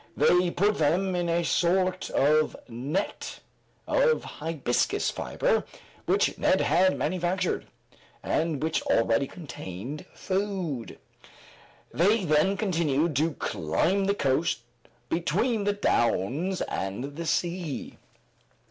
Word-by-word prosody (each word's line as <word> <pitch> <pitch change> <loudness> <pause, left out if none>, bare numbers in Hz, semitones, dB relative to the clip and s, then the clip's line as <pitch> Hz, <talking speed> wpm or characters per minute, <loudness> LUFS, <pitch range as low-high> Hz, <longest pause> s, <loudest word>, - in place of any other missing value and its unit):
They 180 0 +4
put 205 +4 +1
them 180 +5 +2
in 175 -1 0
a 170 +1 +1
sort 185 +2 +1
of 155 +2 +3
net 135 - -3 0.5
of - - +3
hibiscus 150 -6 -1
fiber, - - 0 0.4
which - - +2
Neb - - +3
had 185 +1 +3
manufactured, 180 +2 -1 0.6
and 155 -3 0
which 160 0 0
already 115 +4 +2
contained 135 - -8
food; 185 - -3 1.0
they 200 +5 +3
then 155 +6 +3
continued 165 -6 +1
to 155 +2 +1
climb 185 - 0
the 200 +1 +1
coast 135 - +1 0.5
between 200 - 0
the 205 - +2
downs 160 - 0
and 120 +9 -4
the 165 +1 -4
sea. 170 -4 -2
170 Hz, 105 wpm, -27 LUFS, 145-185 Hz, 1.0 s, They